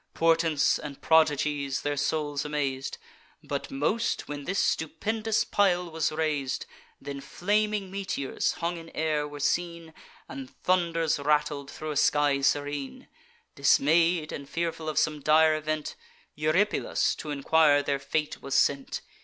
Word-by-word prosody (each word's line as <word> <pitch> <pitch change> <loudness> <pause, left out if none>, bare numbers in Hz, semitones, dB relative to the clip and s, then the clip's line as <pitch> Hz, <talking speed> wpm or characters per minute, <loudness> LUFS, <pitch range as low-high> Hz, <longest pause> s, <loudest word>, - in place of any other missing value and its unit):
Portents 165 -2 +3
and 145 -2 -8
prodigies 150 -3 +2
their 145 0 -1
souls 145 0 -1
amaz'd; 140 -3 -3 0.5
But - - -4
most, 210 +12 -1
when 145 -1 -6
this 195 +2 -2
stupendous 215 +9 0
pile 180 -4 +1
was 160 -1 0
rais'd: 155 -4 -1 0.3
Then 140 0 -7
flaming 205 +6 -1
meteors, 190 -9 -2
hung 170 +1 -3
in 165 0 -10
air, 150 -2 0
were 145 0 -9
seen, 170 +2 -1 0.3
And 135 -1 -8
thunders 165 -4 +1
rattled 150 -1 0
thro' 155 0 -6
a - - -4
sky 145 -1 +3
serene. 145 0 -1 0.4
Dismay'd, 160 +3 +3
and 140 0 -7
fearful 165 -1 -3
of 155 - -5
some 150 -1 +1
dire 155 +2 +4
event, 155 0 -3 0.4
Eurypylus 155 +8 +1
t' 155 - -8
enquire 145 0 +3
their 140 -1 -1
fate 150 +2 -2
was 135 0 -3
sent. 140 -1 +1
155 Hz, 135 wpm, -27 LUFS, 145-165 Hz, 0.5 s, dire